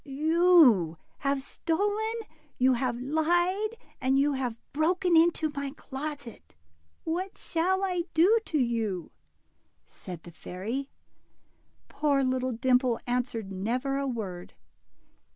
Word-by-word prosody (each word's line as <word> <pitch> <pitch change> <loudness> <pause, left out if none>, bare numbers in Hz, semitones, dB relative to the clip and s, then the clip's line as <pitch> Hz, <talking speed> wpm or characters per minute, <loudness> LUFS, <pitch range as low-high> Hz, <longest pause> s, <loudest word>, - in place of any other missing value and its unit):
You 300 - +4 0.2
have 275 -1 0
stolen, 410 +9 -1 0.4
you 255 +1 +4
have 245 -1 -1
lied, 350 - +1 0.2
and 265 +1 +2
you 285 +1 +3
have 250 -4 -2 0.2
broken 345 +4 +2
into 325 -1 +3
my 280 -1 -3
closet; 275 - -7 0.5
Avhat 365 +4 -3
shall 370 +4 0
I 360 -3 -1
do 385 +8 +5
to 310 - 0
you? 225 - -1 0.4
" - - -44 0.2
said 175 -3 -10
the 175 - -11
fairy. 220 +12 -5 1.0
Poor 285 -2 +1
little 255 0 0
Dimple 250 0 +2
answered 245 -4 -2
never 250 +8 -1
a 275 - -1
word. 195 -8 -5
275 Hz, 115 wpm, -28 LUFS, 240-330 Hz, 1.0 s, do